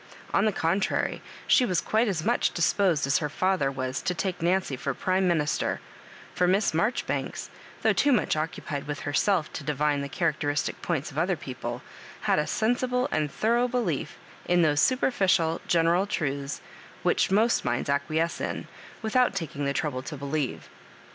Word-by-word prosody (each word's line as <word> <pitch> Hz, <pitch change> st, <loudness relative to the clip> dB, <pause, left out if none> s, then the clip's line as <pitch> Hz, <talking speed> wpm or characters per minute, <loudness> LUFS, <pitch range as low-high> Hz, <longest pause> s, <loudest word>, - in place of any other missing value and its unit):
On 200 Hz, -, +3 dB
the 215 Hz, -, +3 dB
contrary, 190 Hz, +2 st, 0 dB, 0.2 s
she 255 Hz, -, +5 dB
was 185 Hz, -8 st, +1 dB
quite 225 Hz, +2 st, +1 dB
as 175 Hz, -6 st, -1 dB
much -, -, +1 dB
disposed 175 Hz, -2 st, +2 dB
as 140 Hz, -, +2 dB
her 150 Hz, -, -2 dB
&ther 185 Hz, -3 st, +1 dB
was 130 Hz, -1 st, -3 dB
to 180 Hz, -, -1 dB
take 180 Hz, +1 st, -2 dB
Nancy 175 Hz, -4 st, +1 dB
for 135 Hz, +1 st, -3 dB
prime 185 Hz, 0 st, +1 dB
minister; 155 Hz, -4 st, 0 dB, 0.5 s
for 180 Hz, -, +2 dB
Miss 195 Hz, +1 st, +2 dB
Marjoribanks, 215 Hz, +10 st, -1 dB, 0.3 s
though -, -, +4 dB
too 285 Hz, -, +3 dB
much 240 Hz, -10 st, +2 dB
occupied 155 Hz, -2 st, -4 dB
with 145 Hz, -1 st, -4 dB
herself 160 Hz, +3 st, +1 dB
to -, -, -5 dB
divine 150 Hz, 0 st, 0 dB
the 140 Hz, -, -4 dB
cha 175 Hz, -, -5 dB
racteristic 145 Hz, -2 st, -1 dB
points 155 Hz, -5 st, -2 dB
of 145 Hz, -, -3 dB
other 180 Hz, +2 st, +1 dB
people, 130 Hz, -5 st, -6 dB, 0.4 s
had -, -, +2 dB
a 150 Hz, -, -1 dB
sensible 250 Hz, +3 st, 0 dB
and 150 Hz, -2 st, 0 dB
thorough 235 Hz, -, +2 dB
belief 245 Hz, -1 st, -2 dB, 0.3 s
in 175 Hz, -1 st, +4 dB
those 145 Hz, -2 st, +3 dB
superficial 190 Hz, -10 st, +2 dB
genera 170 Hz, +3 st, +3 dB
truths 140 Hz, -7 st, -2 dB, 0.4 s
whidi -, -, +3 dB
most 220 Hz, +5 st, +3 dB
minds -, -, -1 dB
acquiesce 155 Hz, +4 st, 0 dB
in, -, -, -3 dB, 0.4 s
without 245 Hz, +1 st, +2 dB
taking 150 Hz, -6 st, -3 dB
the 140 Hz, -, +1 dB
trouble 140 Hz, -2 st, -2 dB
to 150 Hz, +3 st, -7 dB
believe. 140 Hz, -1 st, -3 dB
165 Hz, 165 wpm, -27 LUFS, 145-195 Hz, 0.5 s, she